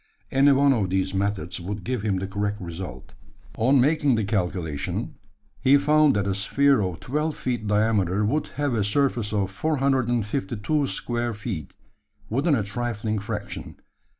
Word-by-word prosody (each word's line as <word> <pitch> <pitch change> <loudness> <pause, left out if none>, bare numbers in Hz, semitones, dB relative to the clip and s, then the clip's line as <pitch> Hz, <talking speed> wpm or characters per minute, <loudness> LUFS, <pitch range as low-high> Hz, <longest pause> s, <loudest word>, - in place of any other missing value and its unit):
Any 140 +2 +5
one 140 0 +5
of 105 -7 0
these 95 +1 0
methods 95 -4 -2
would 100 +4 -5
give 125 -3 -2
him 100 -3 0
the 95 - -2
correct 100 +1 -2
result. 90 +1 -7 0.4
On 130 +5 +3
making 145 0 +3
the 110 - 0
calculation, 90 -7 -2 0.5
he 135 +2 +5
found 150 -1 +4
that 100 -1 +1
a 100 - 0
sphere 135 +6 +2
of 90 -3 -3
12 150 +4 -2
feet 120 -4 -2
diameter 105 -2 +2
would 145 +8 0
have 145 -3 0
a 110 -3 +1
surface 120 -1 +1
of 100 -3 0
452 130 -1 0
square 120 -2 -2
feet, 100 - -6 0.6
within 140 +6 +2
a 110 - 0
trifling 110 0 -2
fraction. 100 0 -6
110 Hz, 150 wpm, -25 LUFS, 100-135 Hz, 0.6 s, Any